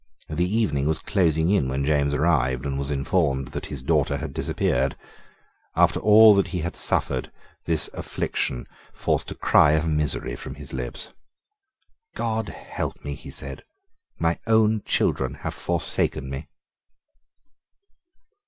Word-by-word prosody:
The 90 +3 0
evening 95 -10 +1
was 80 - +1
closing 85 -4 +1
in 95 -10 +2
when 70 +1 -1
James 70 -1 +2
arrived, 65 -5 +1
and 70 -1 -2
was 70 0 -3
informed 70 -2 0
that - - -6
his 70 -4 -6
daughter 75 -1 +1
had - - -6
disappeared. - - 0 0.8
After - - +3
all 110 0 +8
that 100 -1 +2
he 90 - -3
had 85 +2 -4
suffered, 65 -1 0 0.3
this 80 -2 +4
affliction - - -3 0.3
forced - - -1
a - - -6
cry 75 - +4
of 80 +1 +1
misery 75 -5 -1
from 65 +2 -8
his 75 -1 -9
lips. 60 -2 -4 1.0
"God 110 -2 -2
help - - -5
me," 70 - -3
he 70 - -10
said; 70 0 -6 0.5
"my 85 0 0
own 110 -1 +3
children - - 0
have - - -5
forsaken 65 +1 -1
me." 70 +2 -6
75 Hz, 140 wpm, -24 LUFS, 70-90 Hz, 1.0 s, all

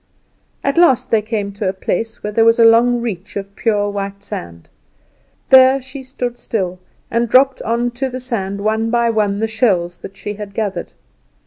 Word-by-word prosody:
At 275 +4 +1
last 335 -9 +3
they 225 - +4
came 210 -2 -3
to 200 -1 -2
a - - -2
place 225 +4 -3
where 210 0 -4
was 230 0 +5
a 230 - +6
long 235 +1 +5
reach 205 -4 -5
of 200 0 -6
pure 210 -3 0
white 200 0 -5
sand; 85 - -8 0.8
there 260 +1 +7
she 270 +1 -9
stood 250 -2 -5
still, 185 -5 -3 0.3
and 235 0 0
dropped 265 +2 +4
on 235 +2 -1
to 265 +2 -3
the 255 0 -5
sand 200 -6 -3
one 220 +2 0
by 235 0 +2
one 210 -3 0
the 220 +2 0
shells 190 -6 0
that 195 - -11
she 205 - -5
had 205 -1 -9
gathered. 200 -5 -3
220 Hz, 185 wpm, -18 LUFS, 200-240 Hz, 0.8 s, there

